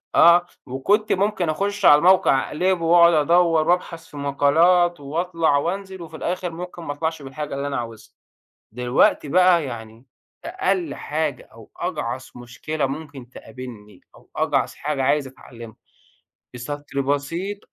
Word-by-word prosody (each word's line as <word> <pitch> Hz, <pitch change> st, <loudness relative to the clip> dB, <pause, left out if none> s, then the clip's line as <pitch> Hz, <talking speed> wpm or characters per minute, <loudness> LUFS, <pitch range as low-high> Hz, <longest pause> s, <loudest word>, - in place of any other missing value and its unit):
آه، 175 Hz, +1 st, +6 dB, 0.2 s
وكنت 200 Hz, -, 0 dB
ممكن 195 Hz, -3 st, 0 dB
أخش 200 Hz, +4 st, -2 dB
على 145 Hz, -, +9 dB
الموقع 175 Hz, -7 st, +4 dB
أقلبه 180 Hz, +1 st, 0 dB
وأقعد 170 Hz, 0 st, +6 dB
أدوّر 165 Hz, +1 st, +3 dB
وابحث 170 Hz, -2 st, -1 dB
في 145 Hz, -, -12 dB
مقالات 165 Hz, +5 st, +3 dB
واطلع 160 Hz, +1 st, 0 dB
وانزل، 190 Hz, +4 st, -4 dB
وفي 165 Hz, -1 st, -10 dB
الآخر 180 Hz, +2 st, -3 dB
ممكن 175 Hz, +1 st, -8 dB
ما 145 Hz, -, -4 dB
اطلعش 160 Hz, +1 st, -3 dB
بالحاجة 140 Hz, +1 st, -6 dB
اللي 140 Hz, +1 st, -3 dB
أنا 140 Hz, -, -3 dB
عاوزها، 115 Hz, -2 st, -8 dB, 0.6 s
دلوقتي 125 Hz, +4 st, +2 dB
بقى 180 Hz, 0 st, +4 dB
يعني 115 Hz, -1 st, -9 dB, 0.4 s
أقل 365 Hz, -1 st, -1 dB
حاجة 150 Hz, -4 st, -3 dB
أو 115 Hz, -1 st, -16 dB
أجعص 130 Hz, -7 st, -4 dB
مشكلة 125 Hz, +5 st, -4 dB
ممكن 140 Hz, -3 st, -7 dB
تقابلني، 115 Hz, -7 st, -11 dB
أو -, -, -21 dB
أجعص -, -, 0 dB
حاجة 145 Hz, -3 st, -3 dB
عايز 145 Hz, +1 st, +1 dB
اتعلمها، 120 Hz, -3 st, -13 dB, 0.8 s
بسطر 140 Hz, +3 st, -5 dB
بسيط 145 Hz, +9 st, -2 dB
155 Hz, 135 wpm, -22 LUFS, 135-175 Hz, 0.8 s, على